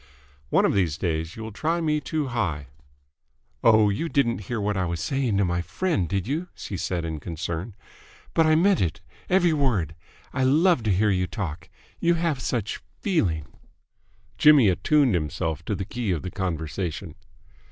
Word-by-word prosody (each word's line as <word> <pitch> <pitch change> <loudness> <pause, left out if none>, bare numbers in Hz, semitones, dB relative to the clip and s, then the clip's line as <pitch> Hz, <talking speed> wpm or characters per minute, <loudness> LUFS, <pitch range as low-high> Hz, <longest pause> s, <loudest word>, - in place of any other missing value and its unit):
"One - - +4
of - - +2
these 85 -6 +1
days 80 -2 -2
you 110 - -7
will 110 - -6
try 160 +11 -1
me 150 -2 0
too 150 -4 -2
high 80 - -2 0.5
!" - - -44
"Oh, 110 -2 +6
you 160 +12 -2
didn't 125 -7 +1
hear 120 -2 -2
what 105 0 -1
I 95 - 0
was 85 -1 -3
saying 130 - 0
to 100 - +3
my 90 0 0
friend, 95 - -1
did 100 +1 -1
you?" 160 +7 -2
she 100 - -6
said 85 -1 -2
in 80 -2 -4
concern. 85 +5 -5 0.6
"But 165 -1 +4
I 155 - +5
meant 190 +4 +4
it, 85 -4 -1 0.3
every 180 -3 +4
word. 115 - +1 0.4
I 130 - 0
love 155 +3 +4
to 105 - +2
hear 105 +3 +3
you 90 -1 +1
talk. 85 -6 -5 0.3
You 170 0 +3
have 165 -5 0
such 115 -5 -2 0.2
feeling!" 95 - 0 0.9
Jimmy 145 -8 +7
attuned 125 - +3
himself 80 -1 -2
to 105 - -1
the 95 - -4
key 120 +1 -3
of 85 -5 -1
the 90 - -5
conversation. 85 -2 -3
100 Hz, 180 wpm, -25 LUFS, 85-145 Hz, 0.9 s, Jimmy